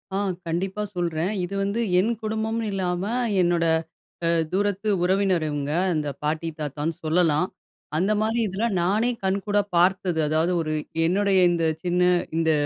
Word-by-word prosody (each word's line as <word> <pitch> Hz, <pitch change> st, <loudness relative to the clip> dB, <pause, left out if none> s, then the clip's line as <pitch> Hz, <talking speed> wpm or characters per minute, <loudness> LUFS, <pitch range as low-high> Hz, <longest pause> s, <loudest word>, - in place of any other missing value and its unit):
ஆ, -, -, +1 dB, 0.3 s
கண்டிப்பா 190 Hz, +5 st, -2 dB
சொல்றேன். 170 Hz, +1 st, -1 dB
இது 180 Hz, +2 st, -4 dB
வந்து 200 Hz, +3 st, -1 dB, 0.2 s
என் 215 Hz, +5 st, +2 dB
குடும்பம்னு 220 Hz, +1 st, -2 dB
இல்லாம, 180 Hz, -2 st, -1 dB, 0.4 s
என்னோட, 175 Hz, -1 st, +2 dB, 0.6 s
அ -, -, +3 dB, 0.2 s
தூரத்து 205 Hz, +2 st, 0 dB
உறவினர் 190 Hz, -2 st, +2 dB
இவுங்க. 145 Hz, -1 st, -2 dB, 0.2 s
அந்த 150 Hz, -2 st, -1 dB
பாட்டி 155 Hz, +2 st, -1 dB
தாத்தான்னு 150 Hz, +2 st, -3 dB
சொல்லலாம். 165 Hz, +1 st, +2 dB, 0.5 s
அந்த 190 Hz, +6 st, +1 dB
மாரி 225 Hz, +2 st, 0 dB
இதுல, 195 Hz, +3 st, -3 dB, 0.2 s
நானே 210 Hz, +7 st, +2 dB
கண்கூடா 200 Hz, +2 st, +1 dB, 0.2 s
பார்த்தது. 180 Hz, -1 st, +2 dB
அதாவது, 160 Hz, +3 st, +1 dB
ஒரு 155 Hz, -1 st, -2 dB, 0.3 s
என்னுடைய 195 Hz, +2 st, +2 dB
இந்த 170 Hz, -1 st, 0 dB, 0.2 s
சின்ன 180 Hz, 0 st, +1 dB, 0.4 s
இந்த 165 Hz, -1 st, +2 dB
180 Hz, 140 wpm, -24 LUFS, 165-200 Hz, 0.6 s, அ